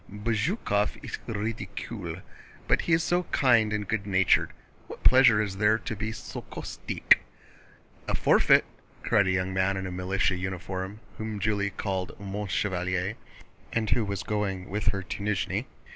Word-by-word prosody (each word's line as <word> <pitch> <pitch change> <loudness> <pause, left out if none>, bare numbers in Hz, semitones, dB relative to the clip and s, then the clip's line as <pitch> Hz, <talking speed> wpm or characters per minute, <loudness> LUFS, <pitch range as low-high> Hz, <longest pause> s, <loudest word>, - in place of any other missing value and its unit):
"Bezúkhov 105 - 0
est - - -5
ridicule, 110 0 -4 0.4
but - - +3
he 165 - 0
is 160 0 +4
so 175 +2 +2
kind 115 -8 +3
and 105 -1 -2
good 105 -2 -2
natured. 95 -3 +3 0.4
What - - -10
pleasure 130 -4 +7
is 95 -2 -4
there 105 +1 +4
to 110 - -5
be 110 +2 -3
so - - -7
caustique?" - - +2 0.9
"A - - +1
forfeit!" - - +5 0.4
cried 100 -3 +3
a - - +2
young 95 0 0
man 95 +1 +1
in 95 -1 -4
militia 90 0 +1
uniform 95 +2 -4 0.2
whom 110 -1 -4
Julie 100 -1 +1
called 95 -2 -4
"mon 100 +1 -4
chevalier," 90 +1 -1 0.6
and 110 -2 -1
who 120 - +3
was 100 -2 -3
going 95 -3 -2
with 105 +1 -2
her 95 0 +1
to 100 - -6
Nízhni. 100 -1 -1
100 Hz, 155 wpm, -28 LUFS, 95-110 Hz, 0.9 s, pleasure